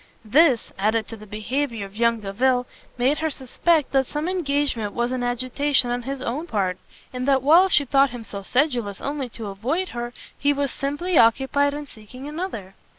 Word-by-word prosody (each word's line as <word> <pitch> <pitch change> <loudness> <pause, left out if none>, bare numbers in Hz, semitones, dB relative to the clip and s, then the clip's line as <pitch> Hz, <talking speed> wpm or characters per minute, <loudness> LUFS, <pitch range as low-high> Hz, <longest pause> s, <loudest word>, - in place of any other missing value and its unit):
This, 265 +1 +4
added 220 +2 +1
to 225 - -6
the 215 -1 -13
behaviour 225 +2 -3
of 195 +1 -13
young 230 0 +2
Delvile, 245 +5 +1 0.3
made 265 +5 +2
her 315 0 0
suspect 295 +3 0
that 270 -2 +2
some 300 +2 -3
engagement 285 - -1
was 240 +1 -1
in 255 -1 -2
agitation 250 +2 +1
on 245 0 -1
his 270 +2 -5
own 290 +8 -3
part, 185 - -1 0.3
and 255 +1 -3
that 270 -2 +3
while 340 +7 +6
she 295 -5 +5
thought 275 +1 +4
him 245 -2 -8
so 200 -2 -7
sedulous 240 -3 0
only 280 -3 -3
to 225 -1 -8
avoid 250 - -2
her, 240 0 -5 0.2
he 285 +1 +2
was 280 -1 -1
simply 290 +5 0
occupied 270 +5 +3
in 295 0 -5
seeking 255 +2 -11
another. 295 - -5
255 Hz, 185 wpm, -23 LUFS, 230-285 Hz, 0.3 s, while